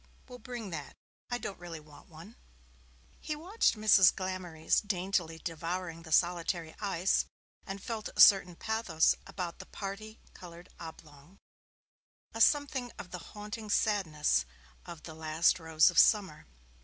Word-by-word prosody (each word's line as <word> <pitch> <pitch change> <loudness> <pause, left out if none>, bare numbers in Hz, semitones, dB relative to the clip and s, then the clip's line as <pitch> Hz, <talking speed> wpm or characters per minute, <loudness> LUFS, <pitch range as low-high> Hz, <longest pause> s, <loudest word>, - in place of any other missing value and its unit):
'Well, 250 -1 -11
bring 240 -6 -7
that. 150 -4 -7 0.3
I 245 - -1
don't 200 - -7
really 170 -2 -8
want 150 -1 -17
one.' 170 +8 -13 0.8
He 305 - -4
watched 360 - +1
Mrs. 210 -4 +6
Glamorys 185 -4 -1
daintily 185 -4 -1
devouring 165 +1 -5
the 160 -1 -12
solitary 170 -1 +1
ice, 195 -3 +1 0.4
and 195 0 -6
felt 225 -2 -4
a - - -8
certain 185 -3 +7
pathos 220 -7 +1
about 180 -3 -5
the - - -10
parti 210 +2 -7
coloured 175 0 -12
oblong, 160 +1 -12 1.0
a 225 - -3
something 275 -3 +2
of 180 - -9
the 180 - -6 0.2
haunting 210 +1 -7
sadness 175 - +1 0.4
of 170 -3 -9
'The 160 - -9
Last 160 +2 +1
Rose 160 +1 +4
of 170 - +3
Summer'. 190 -8 +3
180 Hz, 140 wpm, -31 LUFS, 165-210 Hz, 1.0 s, certain